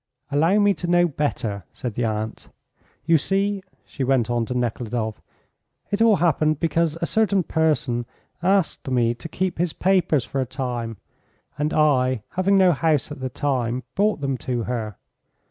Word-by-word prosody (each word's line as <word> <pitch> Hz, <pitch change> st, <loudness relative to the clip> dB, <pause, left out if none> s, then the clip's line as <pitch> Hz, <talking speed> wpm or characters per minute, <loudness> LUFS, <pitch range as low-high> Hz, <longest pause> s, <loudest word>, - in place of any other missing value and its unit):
"Allow 165 Hz, +8 st, +3 dB
me 205 Hz, -1 st, +4 dB
to 175 Hz, -, -5 dB
know 175 Hz, 0 st, +4 dB
better," 125 Hz, -, -2 dB
said 120 Hz, -3 st, -5 dB
the 120 Hz, +2 st, -1 dB
aunt. 110 Hz, 0 st, -4 dB, 0.6 s
"You 165 Hz, 0 st, +4 dB
see," 195 Hz, +4 st, 0 dB, 0.2 s
she 135 Hz, -, -5 dB
went 125 Hz, -3 st, +2 dB
on 120 Hz, -2 st, 0 dB
to 125 Hz, -, -2 dB
Nekhludoff, 115 Hz, -2 st, -2 dB, 0.7 s
"it 205 Hz, +2 st, 0 dB
all 225 Hz, -2 st, +6 dB
happened 155 Hz, -4 st, +2 dB
because 165 Hz, -1 st, +1 dB
a -, -, +3 dB
certain 200 Hz, -1 st, +2 dB
person 145 Hz, -8 st, 0 dB, 0.3 s
asked 190 Hz, -4 st, +1 dB
me 120 Hz, -2 st, +2 dB
to 140 Hz, +7 st, -9 dB
keep 185 Hz, 0 st, -2 dB
his 175 Hz, -2 st, 0 dB
papers 180 Hz, -8 st, +2 dB
for 135 Hz, +4 st, -2 dB
a -, -, 0 dB
time, 120 Hz, -5 st, -4 dB, 0.6 s
and 150 Hz, +1 st, -1 dB
I, 130 Hz, -6 st, +2 dB
having 190 Hz, +2 st, +2 dB
no 185 Hz, -2 st, +6 dB
house 155 Hz, -3 st, +1 dB
at 150 Hz, -, -7 dB
the 130 Hz, 0 st, -3 dB
time, 125 Hz, -2 st, -1 dB
brought 205 Hz, -4 st, +1 dB
them 135 Hz, -2 st, -1 dB
to 120 Hz, -2 st, -2 dB
her. 110 Hz, -4 st, -4 dB
145 Hz, 165 wpm, -23 LUFS, 120-175 Hz, 0.7 s, all